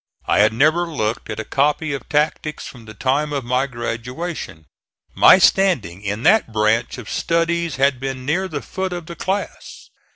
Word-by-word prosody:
I - - +2
had 105 +1 +5
never 155 +9 +2
looked 115 -9 -3
at 105 - -5
a 110 - -4
copy 145 +2 0
of 140 - -7
tactics 150 +1 -1
from 120 -3 -11
the 110 0 -11
time 140 +5 0
of 140 -4 -3
my 125 +3 0
graduation. 120 - -5 0.5
My - - +7
standing 175 - +2
in 105 +2 -4
that 195 - +4
branch 110 +3 +1
of 120 -4 -9
studies 170 -2 0
had 135 -1 +2
been 130 -1 -5
near 180 +7 0
the 150 -5 -5
foot 190 -1 -4
of 175 -2 -6
the 170 - -8
class. 190 +5 -5
140 Hz, 175 wpm, -20 LUFS, 115-165 Hz, 0.5 s, My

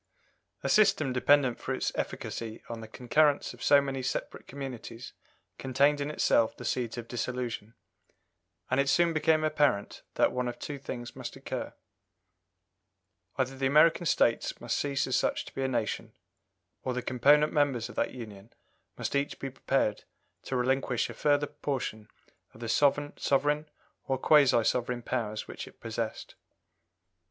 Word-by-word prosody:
A - - 0
system 195 -11 +4
dependent 130 -1 +3
for - - -2
its - - -1
efficacy 115 -1 -5
on 115 -1 -6
the 110 - -8
concurrence 140 +6 +2
of - - -15
so 145 - +6
many 135 -1 -3
separate 130 0 -4
communities 125 -3 -7 0.5
contained 140 +3 +2
in 140 - -2
itself 115 -6 +2
the 120 - -8
seeds 120 0 -2
of 115 -1 -6
dissolution, 120 -2 -4 1.0
and 130 - +2
it 140 0 +2
soon 170 +4 +3
became 155 0 +3
apparent 145 -9 +1
that - - +3
one 125 0 -1
of 120 0 -4
two 145 +3 -6
things 120 -3 -7
must - - -7
occur - - -5 1.6
either 130 0 0
the 135 0 0
American 160 +4 +5
States 115 - +2
must 120 -1 -2
cease 140 -1 0
as 130 - -1
such - - 0
to - - -12
be 135 - -4
a 135 - +1
nation, 120 -5 -2 0.7
or 130 - -3
the 125 - -2
component 145 +4 +4
members 140 -6 +1
of 120 - -10
that - - 0
union 110 -3 -10 0.5
must - - -3
each 140 +1 0
be 135 - -5
prepared 130 -5 0 0.4
to 130 - -3
relinquish 130 -1 0
a - - -8
further 145 -1 +2
portion 125 -7 -4 0.5
of - - -14
the 115 - -5
sovereign 145 +2 +1 0.4
or 135 - +1
quasi 135 -4 +5
sovereign 120 +1 0
powers 110 -4 -3
which - - -7
it - - -16
possessed. 115 0 -4
130 Hz, 155 wpm, -29 LUFS, 120-145 Hz, 1.6 s, so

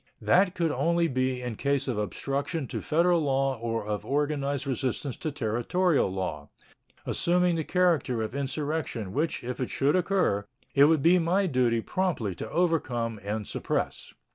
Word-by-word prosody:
That 185 +1 +3
could 165 -3 +1
only 170 +5 +2
be 130 -2 -1
in 120 -3 -4
case 140 0 0
of 120 -5 -1
obstruction 140 +7 -2
to - - -4
Federal 170 +2 +2
law 135 -3 0
or 115 -2 -2
of 105 -1 -3
organized 145 -1 -1
resistance 130 0 -2
to 155 - -3
Territorial 140 - +1
law, 85 -6 -4 0.6
assuming 180 0 +2
the 160 - -1
character 160 -10 +1
of 110 - -5
insurrection, 140 -6 -3
which, 155 +1 -1
if 125 +2 -5
it 130 - -2
should 140 +4 +1
occur, 180 - +1 0.3
it 140 0 +7
would 155 -2 +3
be 180 +2 +6
my 180 +4 +2
duty 125 -7 +2
promptly 155 - -1
to 110 - -7
overcome 125 -10 0
and 105 +1 -3
suppress. - - -3
140 Hz, 160 wpm, -27 LUFS, 120-165 Hz, 0.6 s, it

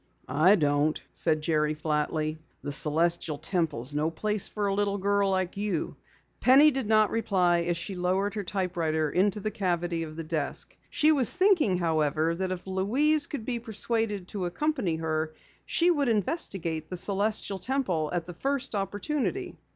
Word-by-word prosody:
"I 175 +7 +4
don't," 150 -2 +1
said 155 -2 +1
Jerry 155 -1 +1
flatly. 155 0 -2 0.2
"The 145 - -3
Celestial 160 +1 0
Temple 160 -5 -1
is 130 +4 -1
no 150 +2 0
place 210 +5 -1
for 210 -1 -3
a 200 - 0
little 200 0 0
girl 200 0 +1
like 185 -1 -1
you." 200 -5 -2 0.4
Penny 280 +4 +6
did 265 -5 -3
not 215 -1 +3
reply 185 -6 +2
as 175 -1 0
she 195 +4 -4
lowered 185 +3 0
her 210 -2 -3
typewriter 170 -5 -1
into 195 +3 +1
the 215 +1 -3
cavity 175 -4 -1
of 155 -1 -6
the 165 - -5
desk. 155 -2 -3
She 305 +1 +3
was 270 -6 +7
thinking, 365 - +3
however, 160 -1 +1
that 185 +2 -3
if 180 -1 -5
Louise 260 +11 +1
could 255 -7 -6
be 240 -1 -2
persuaded 225 -3 -1
to 195 -3 -3
accompany 245 - -1
her, 155 -1 -2 0.3
she 345 +1 +3
would 290 -5 +1
investigate 190 - -1
the 180 - -3
Celestial 200 +1 0
Temple 190 - -1
at 175 -2 -2
the 175 - -8
first 275 +7 -2
opportunity. 205 +9 -3
185 Hz, 165 wpm, -27 LUFS, 160-215 Hz, 0.4 s, was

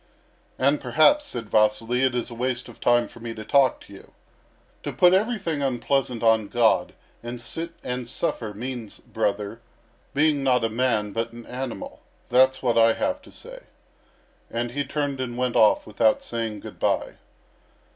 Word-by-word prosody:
"And 140 +3 +2
perhaps," 155 - +4
said 115 -3 -6
Vasily, 110 +3 +2
"it 130 -2 +2
is 120 0 -2
waste 125 +1 -2
of - - -13
time 120 0 +3
for - - -15
me 115 0 -6
to 110 - -8
talk 135 +2 +3
to 100 - -14
you. 95 - -15 0.7
To - - -4
put 180 0 +5
everything 195 -7 0
unpleasant 130 -2 0
on 110 -2 +4
God, 115 +1 +2 0.3
and 120 +1 -6
sit 165 +8 -6
and 125 -1 -4
suffer, 110 -2 -2
means, 115 0 -6
brother, 105 +2 -3 0.5
being 145 -1 +2
not 125 -3 +3
a 115 - +1
man 110 -3 0
but 115 +3 -3
an 120 0 -10
animal. 125 -1 -6 0.3
That's 130 +2 +4
what 120 -2 +3
I 115 0 +6
have 285 - -2
to - - -16
say." - - -10 0.9
And 120 +1 -3
he 145 +3 -1
turned 140 -1 -2
and 120 -2 -4
went 125 -1 -1
off 110 - +4
without 110 +1 +2
saying 115 -3 -4
good - - -10
bye. - - 0
120 Hz, 165 wpm, -24 LUFS, 115-135 Hz, 0.9 s, I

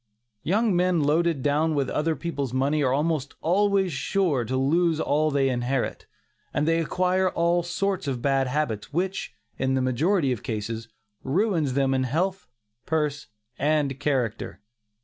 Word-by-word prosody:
Young 210 +2 +1
men 180 -2 +2
loaded 155 -1 +1
down 150 +2 +1
with 140 -2 0
other 160 +1 0
people's 140 -7 -4
money 140 +3 +1
are 130 -3 +2
almost 145 0 -1 0.6
sure 150 -1 0
to 130 +4 -2
lose 160 +4 +2
all 155 0 +1
they 140 -2 +2
inherit, 125 0 -2 0.5
and 150 +1 +1
they 165 0 +3
acquire 185 +3 +1
all 170 0 +1
sorts 185 0 -2
of 130 -3 -2
bad 135 +1 +1
habits 125 -6 -2
which, 185 +5 -2 0.2
in 130 0 +1
the 130 - +1
majority 140 +4 +1
of 120 - -2
cases, 110 +1 -4 0.4
ruins 160 - +1
them 135 -1 +2
in 130 0 +1
health, 180 +8 -1 0.4
purse 150 -2 -1 0.3
and 145 -2 +1
character. 130 -6 -1
150 Hz, 150 wpm, -25 LUFS, 130-170 Hz, 0.6 s, they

